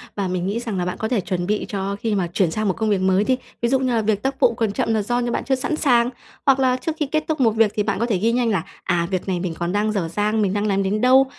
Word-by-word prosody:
Và 200 -2 -1
mình 180 -1 -2
nghĩ 205 +4 -1
rằng 230 -5 -4
là 180 - -1
bạn 180 - -3
có 220 - -2
thể 230 -3 0
chuẩn 175 -1 -3
bị 210 +1 0
cho 200 -1 -2
khi 220 -1 -1
mà 185 -3 0
chuyển 180 -3 +2
sang 215 +4 -1
một 190 - +2
công 220 -1 0
việc 200 -3 +1
mới 190 +1 +3
đi. 255 +4 +1 0.2
Ví 235 - +1
dụ 265 +1 +3
như 255 -2 0
là 230 - +2
việc 210 -1 0
tác 270 0 -2
vụ 235 - +4
còn 225 -2 -1
chậm 225 +2 0
là 220 - +1
do 240 +4 -1
như 240 -1 -1
bạn - - -1
chưa 270 - +2
sẵn 260 +4 -2
sàng, 245 -5 +3 0.4
hoặc 270 -2 +4
là 255 -1 +3
trước 255 +6 -3
khi 300 - +1
kết 310 +2 -1
thúc 315 -2 -1
một 235 -4 +4
việc 220 -1 +3
thì 210 - +1
bạn 200 -1 -1
có 235 - +1
thể 225 -5 0
ghi 225 +5 +1
nhanh 240 -1 +1
là 190 -7 0 0.2
"À, 170 -1 0
việc 185 0 -2
này 185 -2 -1
mình 175 -2 -3
còn 170 0 -1
đang 210 +2 +1
dở 195 -6 -1
dang, 210 +5 0
mình 195 -2 +1
đang 205 +1 0
làm 195 -1 +1
đến 205 +2 -1
đâu?", 260 +2 +6
215 Hz, 335 wpm, -21 LUFS, 195-240 Hz, 0.4 s, đâu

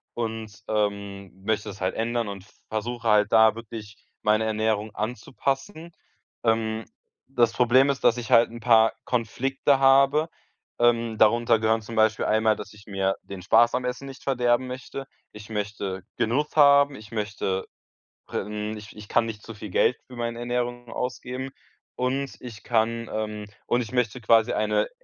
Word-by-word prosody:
und, 110 -2 -4 0.2
ähm, 100 -2 -2
möchte 110 0 -1
das 100 0 -9
halt 95 0 0
ändern 115 0 -1
und 100 -2 -7 0.3
versuche 115 +2 -3
halt 105 0 +4
da 110 -1 +6
wirklich 110 -3 -9 0.3
meine 110 +1 +3
Ernährung 110 -1 -1
anzupassen. 135 - -3 0.5
Ähm, 110 -1 0 0.4
das 120 -3 +2
Problem 130 +3 +4
ist, 135 - -6
dass 115 - +4
ich 120 -2 -6
halt 115 0 +6
'n 120 0 -9
paar 115 -2 +5
Konflikte 135 +4 +1
habe. 135 +3 +5 0.5
Ähm, 115 -2 +2
darunter 115 +1 +4
gehören 110 +1 +2
zum 115 +2 -8
Beispiel 110 0 +3
einmal, 110 0 +3
dass - - -8
ich 105 0 -16
mir 95 -1 0
den 100 -2 -8
Spaß 115 +5 +4
am 125 - -1
Essen 125 +2 -4
nicht 135 0 -11
verderben 125 -1 +1
möchte. 130 +1 -7 0.3
Ich 105 0 -11
möchte 100 -3 -4
Genuss 120 +6 0
haben, 140 -1 +6
ich 105 -3 -12
möchte 105 -3 -2 0.6
pr - - -2
ähm, 105 +1 -4
ich 105 -1 -11
ich 105 -1 -10
kann 120 - +3
nicht 110 -2 -6
zu 115 - -9
viel 105 0 -8
Geld 125 - +3
für 125 - -12
meine 115 0 -3
Ernährung 120 0 -3
ausgeben. 125 +1 -4 0.4
Und 135 +2 -2
ich 115 -4 -10
kann 115 0 0
ähm, 105 -1 -3 0.2
und 120 - +2
ich 115 - -6
möchte 125 0 0
quasi 110 0 +4
eine 105 0 +1
115 Hz, 165 wpm, -25 LUFS, 105-125 Hz, 0.6 s, da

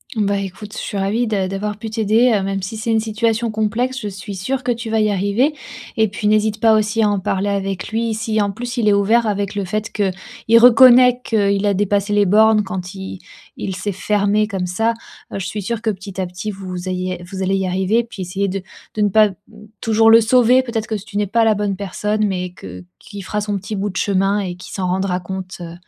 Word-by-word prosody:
Bah, 200 -2 +1
écoute, 200 +2 -7
je - - -8
suis 205 - -4
ravie 205 +5 0
d' 200 -4 -1
d'avoir 205 +2 -3
pu 220 - -5
t'aider, 225 +3 +2
heu, 200 - 0
même 195 0 -2
si 195 +4 -5
c'est 225 +1 -2
une 225 - +3
situation 225 +1 0
complexe, 225 +5 -1
je 210 - -5
suis 195 +1 -8
sûre 255 +8 -2
que 245 - 0
tu 230 -1 -4
vas 220 - +2
y 215 - +2
arriver 205 +9 +1 0.4
et 220 0 +3
puis 210 +1 -3
n'hésite 215 0 +2
pas 220 0 +5
aussi 215 +1 +1
à 210 - +3
en 205 -1 0
parler 195 +2 -1
avec 195 -1 -2
lui. 225 +1 -1
Si 220 0 -1
en 205 -1 +1
plus 245 +5 -6
il 225 -3 +1
est 205 - +5
ouvert 220 +4 +3
avec 205 -1 -2
le 200 -1 -2
fait 215 +4 -3
qu'il 205 +3 0
reconnaît 250 +1 +7
qu'il 200 -2 +1
a 205 - +3
dépassé 205 +1 0
les 205 -1 +3
bornes 215 +2 +5
quand 185 -1 -5
il 190 -1 -7 0.4
il 190 - -4
s'est 205 +2 -3
fermé 205 +2 +1
comme 190 -4 -3
ça, 225 +6 0 0.4
heu, - - -3
je 185 - -4
suis 205 +1 -5
sûre 230 +2 -3
que 225 - 0
petit 195 -1 -5
à 185 - -2
petit 180 +4 -5
vous 185 -2 -7
ayez 185 -1 -3
vous 190 -1 -5
allez 190 +1 +1
y 190 -1 0
arriver. 190 +5 +1
Puis 225 -4 -10
essayer 190 +2 -2
de 195 0 -3 0.3
de 215 - -2
ne 205 - +3
pas 215 +1 +5
t 190 - -11 0.5
toujours 225 0 +4
le 230 - +8
sauver, 250 +2 +4
peut-être 230 -3 -3
que 230 - -5
tu 205 0 -6
n'es 210 - +1
pas 230 +4 +2
la 220 -1 +3
bonne 205 -1 -1
personne 210 +2 -1
mais 180 -2 -3
que 90 - -10 0.2
qu'il 205 -2 -10
fera 210 +3 -3
son 205 -1 -2
petit 200 +3 -6
bout 200 +1 -2
de 190 - -6
chemin 195 +1 +1
et 180 -3 -4
qu'il 180 - -11
s'en 185 -2 -2
rendra 185 0 -1
compte, 185 +1 -7
heu, 170 -1 -7
205 Hz, 240 wpm, -19 LUFS, 195-220 Hz, 0.5 s, le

